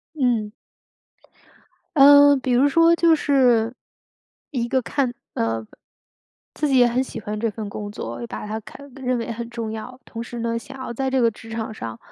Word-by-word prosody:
嗯。 240 -7 0 1.5
嗯， 285 0 +8
比 260 -1 -1
如 255 +4 +4
说 330 +3 +5
就 335 -1 +4
是， 250 -6 +3 0.8
一 240 -5 -2
个 260 +2 +2
看 260 0 -1 0.2
呃， 115 -1 -2 0.9
自 300 - -1
己 270 -2 +3
也 245 - +6
很 240 +2 +1
喜 255 - -7
欢 210 +1 -5
这 225 +1 0
份 210 0 -6
工 205 0 -6
作， 120 - -6
把 - - -6
它 215 +1 -4
看 280 +6 -13
认 255 -2 -1
为 230 0 -4
很 235 +1 -6
重 230 -2 -4
要。 235 +3 -7
同 230 - -7
时 240 0 -7
呢， 230 0 -1
想 270 +3 -11
要 260 -2 -5
在 265 +3 -2
这 260 0 +2
个 230 -1 +4
职 225 +1 -13
场 225 -1 -4
上， 115 - -7
240 Hz, 200 characters per minute, -22 LUFS, 220-270 Hz, 1.5 s, 嗯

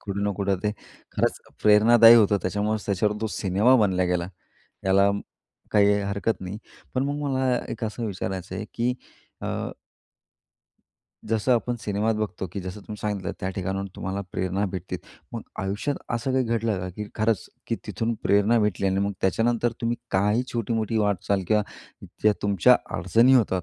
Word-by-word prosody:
कुठं 100 0 -4
ना 105 - +1
कुठं 100 -1 +1
ते 105 - 0 0.4
खरंच - - +1 0.2
प्रेरणादायी 115 +2 +8
होतं. 105 -2 +5
त्याच्यामुळं 105 +1 0
त्याच्यावर 105 +1 +1
तो 110 - 0
सिनेमा 100 +7 +3
बनला 95 -2 +1
गेला. 90 0 -1 0.6
याला 100 +1 +4 0.6
काही 105 -1 +5
हरकत 100 +3 -1
नाही 95 +3 -6 0.4
पण 130 +1 +1
मग 145 +1 -1
मला 130 -2 +1
एक 115 0 -4
असं 110 +2 -3
विचारायचं 95 -1 -4
आहे 105 - -4
की 120 +2 0 0.5
अ - - -5 1.8
जसं 115 +3 +2
आपण 120 +1 0
सिनेमात 105 +2 0
बघतो 100 -3 -3
की 100 - -4
जसं 95 +3 -7
तुम्ही 105 +1 -8
सांगितलं 105 -3 -2
त्या 95 - -2
ठिकाणावरून 95 +1 -3
तुम्हाला 95 +1 -3
प्रेरणा 95 +2 -1
भेटते. 95 -1 -4 0.4
मग - - -4 0.2
आयुष्यात 100 +9 -2 0.2
असं 120 +3 -1
काही 130 0 +2
घडलं 115 -3 0
का 90 - -4
की 105 -1 -4
खरंच 110 -3 0 0.2
की - - -1
तिथून 115 +1 -2
प्रेरणा 105 +4 +3
भेटली? 100 -2 0
आणि 95 +1 +1
मग 100 0 0
त्याच्यानंतर 115 +4 +1
तुम्ही 120 0 0
काही 105 +5 +2
छोटी-मोठी 115 -1 -1
वाटचाल 100 -1 0
किंवा 105 -1 +3 0.6
ज्या 105 - +5
तुमच्या 100 -4 +5 0.2
अडचणी 115 +9 +4
होतात 95 -7 +2
105 Hz, 160 wpm, -25 LUFS, 95-115 Hz, 1.8 s, प्रेरणादायी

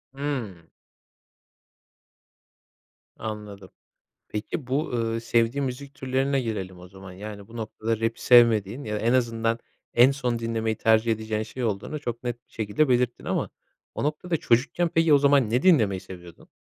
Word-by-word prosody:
Hıı. 120 - -4 2.5
Anladım. 105 -3 -7 0.6
Peki, 105 +6 -4
bu, 140 +5 -1
ııı, 115 -1 -1
sevdiğin 115 +4 +1
müzik 135 +2 -6
türlerine 135 +1 0
gelelim 95 -6 -4
o 90 - -12
zaman. 95 0 -12
Yani, 100 +1 -9
bu 115 - -11
noktada 110 0 -3
rap'i 115 0 -2
sevmediğin, 115 0 +5
ya, 105 -1 -3
en 115 +3 +1
azından, 115 -2 +1 0.4
en 120 +3 +7
son 125 -4 -1
dinlemeyi 115 -1 -1
tercih 110 +1 +3
edeceğin 110 0 -2
şey 120 +3 -5
olduğunu 110 +8 -3
çok 120 -4 -5
net 120 0 -5
bir - - -33
şekilde 110 +7 0
belirttin 125 -1 +1
ama - - -1 0.4
o - - -3
noktada 160 +3 -1
çocukken 140 +8 +1
peki, 165 -1 +3
o - - +7
zaman 140 -5 +4
ne 125 +4 +1
dinlemeyi 110 - +4
seviyordun? 90 -3 -12
115 Hz, 150 wpm, -25 LUFS, 105-130 Hz, 2.5 s, en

